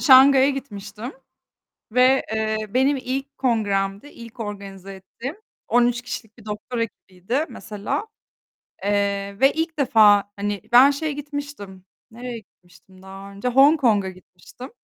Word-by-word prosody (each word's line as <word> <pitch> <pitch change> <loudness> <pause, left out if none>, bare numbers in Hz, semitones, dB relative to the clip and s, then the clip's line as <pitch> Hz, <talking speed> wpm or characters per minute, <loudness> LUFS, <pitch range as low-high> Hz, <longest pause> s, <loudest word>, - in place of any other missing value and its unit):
Şanghay'a 270 0 +7
gitmiştim 220 -3 -7 0.8
ve, 255 +2 +4
eee, 220 0 0
benim 265 +5 +2
ilk 270 +2 -5
kongremdi, 205 -3 0
ilk 230 -3 -13
organize 195 -2 -7
ettiğim 235 - -8 0.3
13 245 0 +2
kişilik 225 -2 -8
bir 220 - -15
doktora 215 +3 -4
ekibiydi, 225 - -4
mesela, 220 - -5 0.8
eee, 200 -1 -1
ve 270 +1 +5
ilk 320 -1 -3
defa, 210 -6 +5
hani, 205 -1 -3
ben 260 +4 +8
şeye 300 +2 -2
gitmiştim, 285 -10 -7 0.3
nereye 240 +1 -7
gitmiştim 185 -1 -21
daha 195 +1 -11
önce? 200 +5 -3
Hong 280 +5 +5
Kong'a 205 -6 +2
gitmiştim 185 +7 -13
230 Hz, 125 wpm, -22 LUFS, 200-265 Hz, 0.8 s, ben